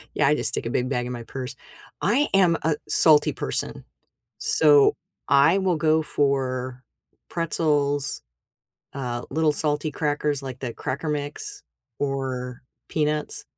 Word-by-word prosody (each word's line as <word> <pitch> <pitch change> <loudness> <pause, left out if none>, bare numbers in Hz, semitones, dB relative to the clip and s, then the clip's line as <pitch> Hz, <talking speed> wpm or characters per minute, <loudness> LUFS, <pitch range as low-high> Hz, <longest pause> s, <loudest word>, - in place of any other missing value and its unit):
Yeah, - - +3
I - - +4
just - - 0
stick - - -2
a - - -2
big 125 0 0
bag 125 -2 -1
in 125 - -4
my 120 - -6
purse, 130 +2 -7 0.5
I 260 +10 +2
am 180 -4 +5
a 160 -1 +1
salty 155 -2 +5
person, - - -3 0.5
so 145 -3 +5 0.3
I 145 +7 +5
will 185 -3 +1
go 155 0 +2
for 130 -3 -1 0.5
pretzels, 145 -4 0 0.7
uh, 120 -3 -4
little 155 +1 +2
salty 150 +1 0
crackers, 145 -2 -1
like 130 -2 -7
the 125 -3 -4
Cracker 145 +4 -4
Mix, 150 - -4 0.4
or 130 -3 -3 0.3
peanuts, 150 -1 -1
145 Hz, 135 wpm, -24 LUFS, 130-155 Hz, 0.7 s, am